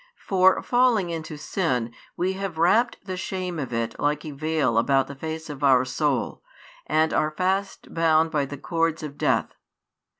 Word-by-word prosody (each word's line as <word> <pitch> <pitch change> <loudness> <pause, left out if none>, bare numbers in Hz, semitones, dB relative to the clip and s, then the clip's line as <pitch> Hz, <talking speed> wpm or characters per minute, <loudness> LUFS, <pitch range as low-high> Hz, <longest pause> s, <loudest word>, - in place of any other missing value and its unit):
For, 190 -1 +3
falling 240 -8 +2
into 160 -2 -5
sin, 125 -9 -1 0.2
we 185 +2 0
have 190 -3 -5
wrapped 215 +8 +2
the 185 -2 -4
shame 185 -2 -4
of 135 -4 -4
it 115 -1 -3
like 150 +2 0
a 155 - -5
veil 145 -5 0
about 135 +2 +2
the 140 - -8
face 160 +3 -6
of 145 -1 -7
our 130 -2 +5
soul, 140 +2 -1 0.5
and 160 +1 +2
are 155 - +2
fast 190 +5 -2
bound 160 -1 +3
by 145 -2 +1
the 145 - -7
cords 165 +1 -1
of 145 -2 -6
death. - - 0
160 Hz, 170 wpm, -24 LUFS, 140-185 Hz, 0.5 s, our